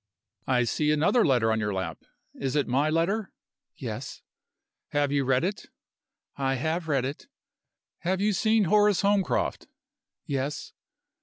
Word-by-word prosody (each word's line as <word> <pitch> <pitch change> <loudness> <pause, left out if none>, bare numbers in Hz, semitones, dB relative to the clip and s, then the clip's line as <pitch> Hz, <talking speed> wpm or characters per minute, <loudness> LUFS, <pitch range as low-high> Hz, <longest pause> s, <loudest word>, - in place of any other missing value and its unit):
"I 125 -2 +3
see 150 +5 0
another 160 +11 +3
letter 120 -5 +3
on 110 - +1
your 105 -2 -1
lap. 90 -5 -4 0.3
Is 135 0 -3
it 145 - +1
my 140 +5 +2
letter?" 185 +6 0 0.4
"Yes." - - -6 0.7
"Have 145 -1 +1
you 140 -1 +1
read 130 0 +2
it?" 200 +3 -3 0.7
"I 135 -1 0
have 160 +5 -2
read 140 -4 +1
it." 140 - -6 0.7
"Have 185 +2 -1
you 210 +1 +2
seen 220 +2 +3
Horace 205 +2 +4
Holmcroft?" 200 -1 +1 0.6
"Yes." 140 +1 -3
150 Hz, 140 wpm, -27 LUFS, 130-190 Hz, 0.7 s, Horace